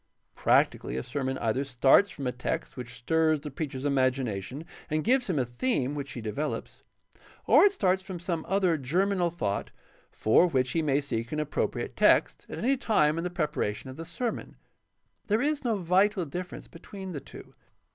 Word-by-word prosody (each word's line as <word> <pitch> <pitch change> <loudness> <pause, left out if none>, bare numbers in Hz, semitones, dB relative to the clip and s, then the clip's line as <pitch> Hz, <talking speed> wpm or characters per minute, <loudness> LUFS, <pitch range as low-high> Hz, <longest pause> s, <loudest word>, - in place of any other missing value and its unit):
Practically, 65 - +2
a 65 - -2
sermon 130 -2 -3
either 115 +3 0
starts 135 +8 +4
from 140 -6 -7
a 125 - 0
text 125 +1 -4
which 125 -1 -7
stirs 160 +4 +2
the 150 -1 -7
preacher's 140 -1 -5
imagination 130 - -1 0.2
and 155 0 0
gives 250 0 +2
him 175 - 0
a 130 - +1
theme 130 - -1
which 140 -3 -5
he 120 - -7
devel 140 +8 -2
ops, - - -14 0.6
or - - +7
it 405 - +5
starts 190 - +1
from 190 -1 -7
some 170 -2 -3
other 185 -4 +2
germinal 180 +6 +1
thought 105 -12 -3 0.4
for 110 +11 +3
which 130 -6 0
he 165 - +1
may 145 -2 +2
seek 115 -4 -4
an 150 - -2
appropriate 150 -1 -2
text - - +3
at - - -6
any 270 +3 +1
time 160 - +2
in - - -3
the 180 - -1
prepara 150 -11 -1
tion 130 - -9
of - - -10
the 165 - -5
sermon. 225 +8 -4 0.7
There 215 +1 +2
is 290 +2 0
no 230 -4 +1
vital 185 +1 +2
difference 180 +5 -6
between 190 +2 -9
the 145 -5 -5
two. - - -13
155 Hz, 185 wpm, -28 LUFS, 130-185 Hz, 0.7 s, or